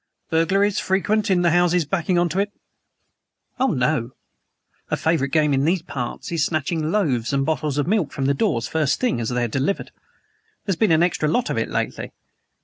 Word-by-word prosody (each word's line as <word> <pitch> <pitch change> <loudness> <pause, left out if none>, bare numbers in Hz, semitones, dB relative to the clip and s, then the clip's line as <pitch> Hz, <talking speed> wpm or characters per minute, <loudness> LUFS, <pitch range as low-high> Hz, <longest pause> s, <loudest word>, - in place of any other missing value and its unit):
"Burglaries 195 +5 +2
frequent 205 +3 0
in 180 -2 +3
the 170 - +3
houses 175 -1 +3
backing 175 +2 0
on 175 0 +3
to 180 +5 -1
it?" 205 +1 0 1.1
"Oh, 265 - +3
no. 130 - 0 0.8
A - - 0
favorite 160 -4 +1
game 150 -2 +3
in 135 0 +2
these 170 +2 +1
parts 125 -4 -5
is 165 -3 +1
snatching 155 0 -1
loaves 140 - 0
and 135 -1 +1
bottles 155 -2 -1
of 145 - +1
milk 190 -3 0
from 135 - -3
the 140 - +3
doors, 120 -4 0
first 155 -3 0
thing, 245 - 0
as 110 - -2
they're 125 -1 0
delivered. 135 - -2 0.7
There's 195 -3 0
been 205 +2 +2
an 160 +1 +4
extra 160 -3 +1
lot 245 +10 0
of - - -2
it - - -2
lately. - - -3
160 Hz, 190 wpm, -22 LUFS, 140-185 Hz, 1.1 s, an